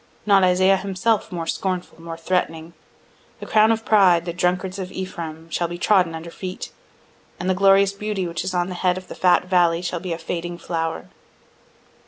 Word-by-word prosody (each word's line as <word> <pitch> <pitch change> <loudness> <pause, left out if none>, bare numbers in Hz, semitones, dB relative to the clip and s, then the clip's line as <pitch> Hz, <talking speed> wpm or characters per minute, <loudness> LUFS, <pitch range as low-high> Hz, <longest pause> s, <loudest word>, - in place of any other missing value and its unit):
Not 200 -2 +5
Isaiah 185 +1 +4
himself 200 +3 -1
more 170 -2 -4
scornful, 180 0 -3
more 165 0 -7
threatening: 165 -1 -2 0.7
"The - - -7
crown 215 +1 +4
of 225 0 -1
pride, 185 -6 +4
the 170 - -3
drunkards 180 +2 -1
of 185 -1 -5
Ephraim, 165 -4 -6
shall 170 +2 0
be 175 +1 -6
trodden 180 -2 +2
under 165 +1 -8
feet: 185 +1 -7 0.7
And 175 - -3
the 190 - +3
glorious 195 +1 +4
beauty 205 -2 -3
which 170 -1 -3
is 185 - -3
on 175 0 +1
the - - -4
head 180 0 0
of 185 - -9
the - - -6
fat 180 -1 +3
valley 175 -2 +2
shall 175 -1 -2
be 180 0 -6
a 165 - -2
fading 170 +1 -5
flower." 165 - -3
180 Hz, 190 wpm, -22 LUFS, 170-190 Hz, 0.7 s, Not